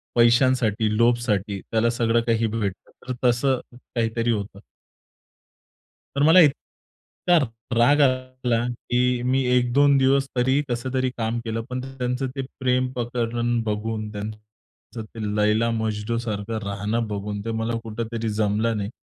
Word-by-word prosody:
पैशांसाठी, 120 -2 +3
लोभसाठी 115 -4 +1
त्याला 115 +1 0
सगळं 115 -1 +1
काही 115 0 +2
भेटतं. 105 -3 -4 0.2
तर 130 - -2
तसं 125 +2 +2 0.4
काहीतरी 115 0 0
होतं. 100 -2 -4 1.6
तर 140 - +2
मला 160 +4 +7
इतका 170 +3 0 0.4
राग 145 +5 +5
आला, 130 -3 +1
की 125 0 0
मी 130 +1 +2
1-2 140 +3 +4
दिवस 135 +1 +3
तरी, 130 +3 +2
कसं 120 +2 -2
तरी 130 0 +1
काम 115 +1 -1
केलं. 115 0 -2
पण 125 0 -3
त्यांचं 130 0 -3
ते 135 - -2 0.2
प्रेम 130 0 +1
प्रकरण 120 -1 -1
बघून, 110 0 -3
त्यांचं 105 +2 -9
ते 110 +1 -12 0.2
लैला-मजनूसारखं 110 0 0
राहणं 105 +3 -2
बघून, 105 0 -4
ते 115 - -2
मला 115 +1 -1
कुठेतरी 115 0 -4
जमलं 110 +2 +1
नाही. 100 0 -3
115 Hz, 125 wpm, -24 LUFS, 110-125 Hz, 1.6 s, मला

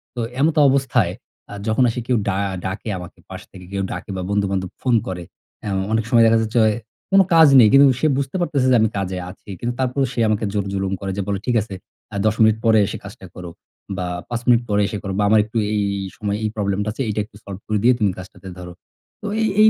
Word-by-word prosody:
তো - - -5 0.2
এমত 155 +3 +2
অবস্থায় 125 -9 +1 0.4
আ - - -7
যখন 110 +4 +2
আসে 115 - -3
কেউ 125 - +2
ডা 95 -1 0 0.3
ডাকে 95 +4 -4
আমাকে 90 -1 -10
পাশ - - -8
থেকে 90 -1 -12
কেউ 100 -1 -2
ডাকে - - -7
বা, - - -3
বন্ধু 100 0 +1
-বান্ধব 95 -2 -2
ফোন 125 -2 +2
করে 90 -2 -5 0.4
হ্যাঁ, 100 - -3
অ - - 0
অনেক 110 0 +1
সময় 120 -3 +5
দেখা 115 0 +4
যাচ্ছে 110 +2 -3
অয় 110 -1 +2 0.4
কোন 195 0 +7
কাজ 160 -1 +8
নেই। 115 - +8
কিন্তু 140 +1 +8
সে 155 - +2
বুঝতে 140 +2 -3
পারতেছে 145 -6 +1
যে - - +5
আমি 110 - +3
কাজে 95 -1 -3
আছি। 95 +3 -14
কিন্তু 120 +1 -2
তারপরেও 130 +1 0
সে 125 - -4
আমাকে 110 0 0
জোর 100 -2 -1
জুলুম 95 0 -1
করে 95 -1 -3
যে - - 0
বলে, 100 -1 -1
"ঠিক 125 - 0
আছে, 105 -1 -8 0.4
আ - - -6
১০ 110 0 +2
মিনিট 110 0 +5
পরে 110 -1 +5
এসে - - -5
কাজটা 100 -1 -11
করো। 90 -1 -8 0.5
বা, 90 - -2 0.2
৫ 120 -1 -3
মিনিট 120 -1 +5
পরে 105 0 +2
এসে 105 - -4
করো 95 -1 -4
বা, - - +3
আমার 110 +1 +5
একটু 110 +2 -6 0.2
এই 105 - +1 0.2
এই - - -5
সময়ে 105 -1 -2
এই 110 - 0
প্রবলেমটা 100 0 -1
আছে, 125 - -5
এইটা 105 - -2
একটু 105 - -24
সল্ভ 100 -1 -7
করে 110 - 0
দিয়ে 125 +2 +6
তুমি 105 -3 +2
কাজটাতে 95 0 -11
ধরো।" 90 -1 -8 0.5
তো 210 - -5
এই 220 - +2
এই 215 - +8
110 Hz, 245 wpm, -21 LUFS, 95-120 Hz, 0.5 s, কাজ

